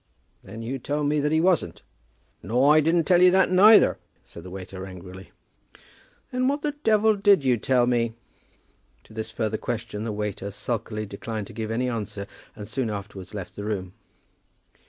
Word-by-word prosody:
"Then 110 +4 -9
you 130 +4 -4
told 145 +4 -2
me 150 0 +1
that 150 +1 0
he 160 - +3
wasn't." 170 - +1 0.6
"Nor 125 - +3
I - - +7
didn't 165 +2 +2
tell 175 +1 +4
you 180 - +8
that 190 0 +3
neither," 210 +4 +6 0.3
said 85 - -12
the 90 - -10
waiter 95 0 -8
angrily. 95 0 -10 1.0
"Then 255 0 0
what 285 +2 -1
the 300 - 0
devil 220 0 +4
did 200 -7 +4
you 125 -2 +4
tell 125 +2 +2
me?" 120 -2 0 0.9
To - - -18
this 110 0 -5
further 110 -1 -2
question 115 -3 -4
the 115 - -3
waiter 105 -1 -4
sulkily 110 +1 -4
declined 105 +1 -6
to - - -13
give 110 0 -4
any 120 +3 -1
answer, 105 -4 -4 0.3
and 105 -1 -8
soon 120 +1 -2
afterwards 100 -1 -7
left 95 -4 -7
the 100 - -6
room. 95 -4 -4
115 Hz, 175 wpm, -25 LUFS, 105-150 Hz, 1.0 s, you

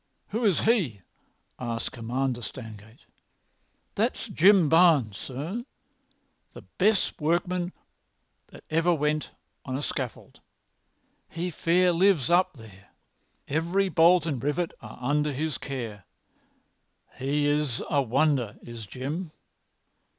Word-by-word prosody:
"Who 225 +3 -2
is 195 -6 +3
he?" 175 - +1 0.6
asked 120 -2 -3
Commander 120 +2 -2
Stangate. 110 -1 -9 0.9
"That's - - -1
Jim 185 -1 +5
Barnes, 155 - +4
sir, 155 - -5 0.9
the - - -11 0.2
best 200 -3 +2
workman 175 +3 0 0.8
that - - -15
ever 165 +2 +3
went 150 0 -1 0.3
on 130 -1 -3
a 145 - -4
scaffold. 130 -4 -5 0.9
He 175 +2 -3
fair 175 +3 +3
lives 170 -5 +3
up 180 +2 +4
there. 105 -6 -15 0.6
Every 170 +6 +1
bolt 170 0 +5
and 140 -8 -3
rivet 150 +4 0
are 110 -2 -10
under 145 +4 +1
his 155 +2 -2
care. 115 -8 -6 1.1
He's 145 -1 +1
a 145 - +2
wonder, 135 -3 +1
is 115 -3 -9
Jim." 150 - -5
150 Hz, 110 wpm, -27 LUFS, 125-175 Hz, 1.1 s, Jim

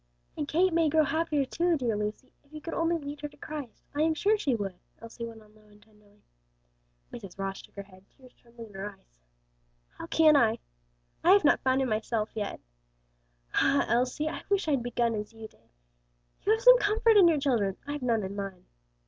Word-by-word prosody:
"And 295 - -3
Kate 355 +4 +2
may 330 -2 +3
grow 315 +1 +4
happier, 305 -2 0
too; 340 +4 0
dear 240 -5 -1
Lucy, 210 +5 -5
if 285 - -30
you 310 - -8
could 330 +2 -7
only 335 0 +1
lead 290 -1 -8
her 295 - -3
to 290 - -19
Christ, 295 -7 -8
I 290 - -1
am 320 0 +2
sure 410 +7 +2
she 285 - 0
would," 195 -4 -5 0.2
Elsie 230 +1 -8
went 225 -1 -12
on 210 0 -23
low 215 0 -23
and 205 0 -21
tenderly. 210 -1 -26 0.9
Mrs. 200 -6 -9
Ross 195 0 -4
shook - - -19
her 200 - -6
head, 185 -1 -19
tears 255 -2 -20
trembling 235 -1 -14
in - - -18
her 195 +2 -5
eyes. - - -21 0.8
"How - - -7
can 310 -2 +5
I? 230 -5 +3 0.7
I 360 - +7
have 405 - +5
not - - +5
found 260 +1 +1
him 260 - -2
myself 215 0 -2
yet. 210 -2 -4 0.9
Ah, 280 - +3
Elsie, 250 +6 0
I 310 - -4
wish 400 -3 +1
I'd 280 -5 +1
begun 235 -1 0
as 210 +1 -5
you 225 -1 -9
did. 115 - -29 0.7
You 415 - +1
have 445 +1 +2
some - - +8
comfort 435 +1 +3
in 390 -4 +7
your 325 -2 +3
children; 225 -9 0
I've 290 0 -5
none 230 -4 0
in 190 +1 -5
mine. 195 -3 -6
250 Hz, 210 wpm, -28 LUFS, 210-310 Hz, 0.9 s, some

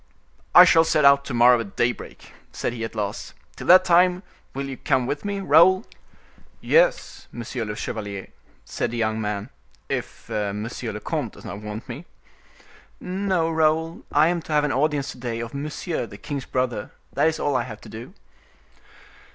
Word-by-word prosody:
"I 180 - +11
shall 165 -2 +6
set 155 -2 +2
out 140 0 +6
to 135 - -5
morrow 120 +1 +6
at 100 -4 -7
daybreak," 120 0 -3 0.2
said - - -3
he 115 -2 -5
at 115 - -5
last. 105 -1 -4 0.2
"Till - - -8
that 185 +1 +8
time, 180 +1 +4 0.3
will 135 0 -3
you 135 - -5
come 130 -2 0
with 145 +3 -3
me, 200 -1 -3
Raoul?" 185 +5 +5 0.7
"Yes, - - +1
monsieur 120 0 -5
le 105 0 -5
chevalier," 100 -3 -5 0.4
said - - -3
the 120 - -5
young 110 -1 0
man, 105 +2 -4 0.4
"if - - -5
monsieur 105 +2 -3
le - - -6
comte - - -3
does - - -14
not 100 - -7
want 105 +4 -7
me." 135 +7 -8 0.9
"No, 185 -3 -1
Raoul; 160 +1 +1
I 155 +3 +4
am 175 -1 -1
to 155 - -6
have 150 -1 +3
an 150 - 0
audience 145 0 0
to - - -13
day 120 -2 -4
of 115 -1 -6
Monsieur, 150 0 -4
the 100 - -11
king's 140 +2 -5
brother; 125 -5 -2 0.2
that - - +3
is 160 - -1
all 145 -2 0
I 125 - +2
have 110 -3 -8
to - - -12
do." 120 - -10
135 Hz, 185 wpm, -23 LUFS, 115-160 Hz, 0.9 s, I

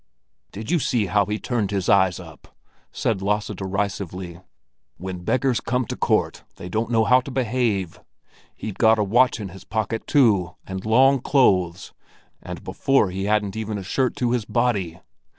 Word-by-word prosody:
"Did 110 +3 -6
you 175 - +3
see 120 -6 0
how 100 +2 +1
he 105 +1 -1
turned 110 -4 -2
his 100 -3 -2
eyes 95 -2 +3
up?" 80 -3 -14 0.3
said 105 -4 -1
Lasse 105 +2 -1
derisively. 95 -2 -4 0.6
"When 90 0 -6
beggars 130 +4 +1
come 125 +1 -1
to - - -5
court, - - 0
they 90 - -9
don't 110 +4 -1
know 115 -2 +3
how 125 +4 +5
to 135 - -9
behave! 120 -8 -1 0.6
He'd 105 -3 -7
got 110 -1 +5
a 105 - +2
watch 120 +5 +3
in 100 -3 -5
his 95 +2 -12
pocket, 110 +1 -3
too, 105 - +3
and 95 +2 -6
long 135 +4 +5
clothes; 95 -12 +2 0.5
and - - -8
before 135 -9 +1
he 95 +1 -3
hadn't 105 -1 0
even 110 -1 -3
a 100 - -6
shirt 130 +6 0
to 120 -1 0
his 120 -2 0
body. 105 -9 -1
105 Hz, 170 wpm, -23 LUFS, 95-120 Hz, 0.6 s, how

